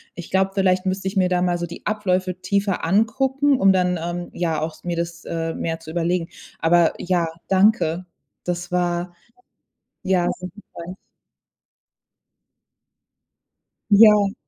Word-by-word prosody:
ich 175 Hz, -, -9 dB
glaube, 190 Hz, 0 st, +2 dB
vielleicht 190 Hz, -1 st, +1 dB
müsste 190 Hz, +1 st, -2 dB
ich 195 Hz, -, -6 dB
mir 185 Hz, -1 st, +4 dB
da 180 Hz, -1 st, +1 dB
mal 175 Hz, -1 st, +1 dB
so 175 Hz, -, -3 dB
die 170 Hz, -, -11 dB
Abläufe 185 Hz, -3 st, -1 dB
tiefer 200 Hz, 0 st, 0 dB
angucken, 265 Hz, -, +2 dB
um 195 Hz, 0 st, +5 dB
dann, 180 Hz, -2 st, +1 dB
ähm, 175 Hz, +1 st, -4 dB
ja 165 Hz, -3 st, -1 dB
auch 155 Hz, 0 st, -5 dB
mir 175 Hz, -1 st, -2 dB
das, 170 Hz, 0 st, -5 dB
äh, 165 Hz, -1 st, -3 dB
mehr 165 Hz, -1 st, -3 dB
zu 160 Hz, -1 st, -9 dB
überlegen. 170 Hz, 0 st, -1 dB, 0.3 s
Aber 170 Hz, 0 st, +4 dB
ja, 175 Hz, -2 st, 0 dB, 0.2 s
danke. 190 Hz, -3 st, +3 dB, 0.4 s
Das 175 Hz, 0 st, -3 dB
war 175 Hz, 0 st, -1 dB, 0.9 s
ja, 180 Hz, -2 st, +2 dB
sehr 180 Hz, 0 st, -7 dB
hilfreich. 180 Hz, -3 st, -10 dB, 3.0 s
Ja. 205 Hz, -1 st, +6 dB
180 Hz, 135 wpm, -22 LUFS, 170-195 Hz, 3.0 s, Ja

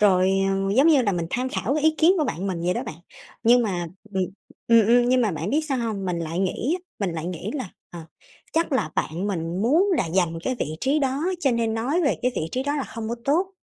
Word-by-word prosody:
Rồi, 190 Hz, -2 st, +4 dB, 0.2 s
ờ, 195 Hz, +1 st, 0 dB
giống 275 Hz, +4 st, +6 dB
như 295 Hz, -5 st, +5 dB
là 205 Hz, -4 st, +1 dB
mình 170 Hz, -2 st, -2 dB
tham 255 Hz, +2 st, -1 dB
khảo 275 Hz, 0 st, -1 dB
cái 305 Hz, -, -1 dB
ý 315 Hz, 0 st, +4 dB
kiến 330 Hz, +3 st, +6 dB
của 310 Hz, -, +2 dB
bạn 195 Hz, -, -3 dB
mình 185 Hz, -3 st, -2 dB
vậy 180 Hz, +1 st, +1 dB
đó -, -, -2 dB
bạn. -, -, -6 dB, 0.5 s
Nhưng 240 Hz, +1 st, +5 dB
mà, 180 Hz, -6 st, -2 dB, 0.3 s
ừm 190 Hz, -, +1 dB, 0.4 s
ừm, 230 Hz, -2 st, +5 dB
ừm, 240 Hz, +1 st, +4 dB
nhưng 255 Hz, 0 st, +4 dB
mà 225 Hz, -4 st, +2 dB
bạn 165 Hz, +4 st, -3 dB
biết 300 Hz, -, +2 dB
sao 270 Hz, -2 st, 0 dB
hông? 220 Hz, -5 st, -2 dB
Mình 180 Hz, -2 st, -1 dB
lại 165 Hz, +1 st, -3 dB
nghĩ 195 Hz, -, 0 dB
á, -, -, -21 dB, 0.3 s
mình 175 Hz, -, -2 dB
lại 160 Hz, 0 st, -4 dB
nghĩ 180 Hz, +3 st, -4 dB
là, 255 Hz, -10 st, -4 dB, 0.2 s
ờ, 170 Hz, -, -8 dB, 0.5 s
chắc 330 Hz, -1 st, 0 dB
là 255 Hz, -, 0 dB
bạn 170 Hz, +5 st, -2 dB
mình 175 Hz, -1 st, -2 dB
muốn 325 Hz, -, +3 dB
là 170 Hz, -, -1 dB
giành 170 Hz, -2 st, +1 dB
cái 255 Hz, -, 0 dB
vị 155 Hz, -5 st, -3 dB
trí 275 Hz, +3 st, +2 dB
đó, 275 Hz, +1 st, 0 dB, 0.2 s
cho 275 Hz, -, +2 dB
nên 230 Hz, -2 st, 0 dB
nói 260 Hz, +10 st, 0 dB
về 285 Hz, -, +2 dB
cái 250 Hz, +1 st, +1 dB
vị 160 Hz, -, -2 dB
trí 255 Hz, -, -1 dB
đó 285 Hz, +2 st, -1 dB
là 280 Hz, -, -1 dB
hông 220 Hz, -1 st, -5 dB
có 235 Hz, -, -1 dB
tốt, 355 Hz, +7 st, +1 dB
225 Hz, 265 wpm, -24 LUFS, 180-270 Hz, 0.5 s, giống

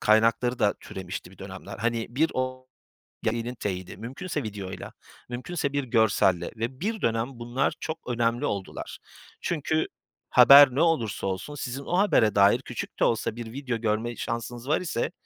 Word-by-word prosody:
kaynakları 115 Hz, +3 st, +3 dB
da 100 Hz, -, +3 dB
türemişti 90 Hz, -1 st, -7 dB
bir 95 Hz, -, -18 dB
dönemler. 95 Hz, -1 st, -8 dB
Hani, 115 Hz, -1 st, 0 dB
bir 150 Hz, +7 st, +2 dB
o 130 Hz, 0 st, -3 dB, 0.6 s
yayının 115 Hz, +2 st, -1 dB
teyidi 95 Hz, -4 st, -4 dB
mümkünse 140 Hz, -, -4 dB
videoyla, 100 Hz, -3 st, -6 dB, 0.4 s
mümkünse 140 Hz, +3 st, -3 dB
bir 145 Hz, -, 0 dB
görselle 105 Hz, -7 st, +2 dB
ve 120 Hz, +4 st, -3 dB
bir 220 Hz, +4 st, -2 dB
dönem 115 Hz, 0 st, +1 dB
bunlar 120 Hz, +5 st, 0 dB
çok 160 Hz, -, -4 dB
önemli 120 Hz, +2 st, +1 dB
oldular. 100 Hz, -6 st, -4 dB, 0.4 s
Çünkü 155 Hz, -1 st, 0 dB, 0.4 s
haber 130 Hz, +1 st, +9 dB
ne 145 Hz, -, +2 dB
olursa 120 Hz, -, +1 dB
olsun, 95 Hz, +10 st, -4 dB
sizin 135 Hz, 0 st, -4 dB
o 175 Hz, -, -1 dB
habere 120 Hz, -, +4 dB
dair 100 Hz, +4 st, +6 dB
küçük 125 Hz, -, -6 dB
de -, -, +3 dB
olsa 115 Hz, -1 st, 0 dB
bir 115 Hz, -1 st, -7 dB
video 130 Hz, -2 st, -3 dB
görme 115 Hz, +1 st, -1 dB
şansınız 120 Hz, +3 st, -4 dB
var 155 Hz, -, +2 dB
ise 155 Hz, -9 st, -2 dB
120 Hz, 155 wpm, -27 LUFS, 110-140 Hz, 0.6 s, haber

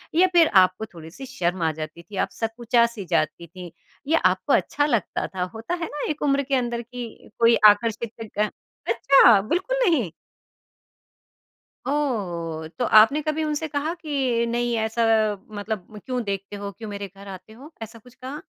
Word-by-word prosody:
या 370 Hz, +2 st, +5 dB
फिर 335 Hz, -2 st, +6 dB, 0.2 s
आपको 185 Hz, +4 st, -2 dB
थोड़ी-सी 165 Hz, +10 st, -10 dB
शर्म 185 Hz, -9 st, -2 dB
आ 160 Hz, -, +2 dB
जाती 155 Hz, +2 st, -7 dB
थी 200 Hz, +3 st, -12 dB
आप -, -, -20 dB
सकुचा-सी 235 Hz, -1 st, 0 dB
जाती 170 Hz, -1 st, -1 dB
थीं 175 Hz, 0 st, -10 dB, 0.4 s
ये 320 Hz, -, +3 dB
आपको -, -, +2 dB
अच्छा 290 Hz, -, +2 dB
लगता 235 Hz, -, -1 dB
था 185 Hz, -1 st, -4 dB
होता 225 Hz, +10 st, -5 dB
है -, -, 0 dB
ना 295 Hz, -, -4 dB
एक 305 Hz, -, -3 dB
उम्र 280 Hz, -1 st, +2 dB
के 275 Hz, 0 st, -1 dB
अंदर 240 Hz, -2 st, -1 dB
की 245 Hz, 0 st, -7 dB, 0.3 s
कोई 230 Hz, 0 st, +6 dB
आकर्षित 220 Hz, +2 st, 0 dB, 0.3 s
अ, 210 Hz, 0 st, +2 dB, 0.4 s
अच्छा 240 Hz, -7 st, +6 dB
बिल्कुल 365 Hz, -, -1 dB
नहीं। 255 Hz, -, +1 dB, 1.7 s
ओह! 180 Hz, -, -2 dB
तो 245 Hz, -, +1 dB
आपने 225 Hz, +8 st, +6 dB
कभी 310 Hz, +1 st, -2 dB
उनसे 305 Hz, +1 st, -2 dB
कहा 295 Hz, +3 st, -2 dB
कि 275 Hz, -8 st, -1 dB
नहीं 240 Hz, 0 st, 0 dB
ऐसा 220 Hz, +1 st, -1 dB, 0.6 s
मतलब 210 Hz, 0 st, -6 dB
क्यों 250 Hz, -2 st, -2 dB
देखते 200 Hz, 0 st, -4 dB
हो? 200 Hz, 0 st, -6 dB
क्यों 220 Hz, +1 st, -9 dB
मेरे 200 Hz, -1 st, -5 dB
घर 200 Hz, +1 st, -13 dB
आते 190 Hz, +2 st, -10 dB
हो, 275 Hz, +8 st, -13 dB
ऐसा 225 Hz, +1 st, -8 dB
कुछ 245 Hz, +2 st, -18 dB
कहा? 270 Hz, +3 st, -8 dB
230 Hz, 170 wpm, -24 LUFS, 200-275 Hz, 1.7 s, फिर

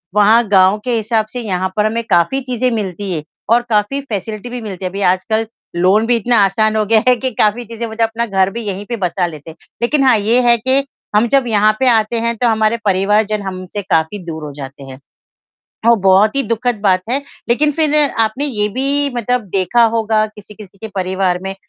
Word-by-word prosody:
वहाँ 215 Hz, +3 st, +5 dB
गाँव 190 Hz, +1 st, +4 dB
के 245 Hz, -2 st, 0 dB
हिसाब 220 Hz, 0 st, 0 dB
से 250 Hz, -, -4 dB
यहाँ 185 Hz, -3 st, -2 dB
पर 210 Hz, -, +2 dB
हमें 230 Hz, +2 st, -1 dB
काफ़ी 175 Hz, +11 st, +2 dB
चीज़ें 255 Hz, -1 st, -1 dB
मिलती 200 Hz, -3 st, -4 dB
हैं 155 Hz, -, -4 dB, 0.3 s
और 240 Hz, -, +4 dB
काफ़ी 215 Hz, +6 st, 0 dB
फ़ेसिलिटी 220 Hz, -2 st, -5 dB
भी 245 Hz, 0 st, -6 dB
मिलती 195 Hz, -4 st, -7 dB
है। -, -, -1 dB
अभी 200 Hz, +2 st, -5 dB
आजकल 220 Hz, +4 st, -2 dB, 0.3 s
लोन 190 Hz, +5 st, +3 dB
भी 240 Hz, +1 st, +2 dB
इतना 235 Hz, +2 st, +1 dB
आसान 215 Hz, +3 st, +1 dB
हो 215 Hz, -1 st, +1 dB
गया 220 Hz, +1 st, +3 dB
है 250 Hz, -, +5 dB
कि 260 Hz, +1 st, -3 dB
काफ़ी 215 Hz, +3 st, +1 dB
चीज़ें 230 Hz, +1 st, -6 dB
वो 220 Hz, -, -8 dB
जो 230 Hz, -, +1 dB
अपना 225 Hz, +1 st, -3 dB
घर 190 Hz, -3 st, +1 dB
भी 235 Hz, -, -5 dB
यहीं 200 Hz, +1 st, -4 dB
पे 235 Hz, -, -2 dB
बसा 180 Hz, -2 st, -1 dB
लेते 155 Hz, -1 st, -10 dB
हैं। 160 Hz, -, -11 dB, 0.3 s
लेकिन 275 Hz, +4 st, +2 dB
हाँ, 250 Hz, -4 st, +5 dB
ये 225 Hz, +5 st, +2 dB
है 235 Hz, -, +5 dB
कि 260 Hz, +4 st, +1 dB, 0.3 s
हम 220 Hz, +3 st, +3 dB
जब 270 Hz, 0 st, +2 dB
यहाँ 215 Hz, -1 st, +3 dB
पे 265 Hz, -, +2 dB
आते 225 Hz, 0 st, +1 dB
हैं 235 Hz, 0 st, -1 dB
तो 245 Hz, -, +1 dB
हमारे 220 Hz, 0 st, +1 dB
परिवार 200 Hz, +2 st, +2 dB
जन 215 Hz, -1 st, -1 dB
हमसे 190 Hz, +1 st, -6 dB
काफ़ी 165 Hz, +1 st, 0 dB
दूर 160 Hz, -2 st, -6 dB
हो 150 Hz, -, -6 dB
जाते 140 Hz, 0 st, -9 dB
हैं। 135 Hz, 0 st, -11 dB, 0.9 s
ओह, 235 Hz, -, +6 dB
बहुत 195 Hz, +5 st, +4 dB
ही 275 Hz, -, +3 dB
दुखद 235 Hz, -1 st, -1 dB
बात 185 Hz, -3 st, +2 dB
है, 270 Hz, +3 st, 0 dB, 0.3 s
लेकिन 295 Hz, +5 st, +2 dB
फिर 305 Hz, 0 st, +1 dB, 0.2 s
आपने 225 Hz, +6 st, 0 dB
ये 210 Hz, -7 st, 0 dB
भी 275 Hz, +5 st, +1 dB
मतलब 245 Hz, +1 st, 0 dB
देखा 195 Hz, +6 st, +2 dB
होगा 220 Hz, -1 st, +1 dB
किसी-किसी 210 Hz, -2 st, -14 dB
के 220 Hz, -, -7 dB
परिवार 185 Hz, -1 st, -1 dB
में, 195 Hz, 0 st, -5 dB
215 Hz, 220 wpm, -16 LUFS, 195-235 Hz, 0.9 s, ओह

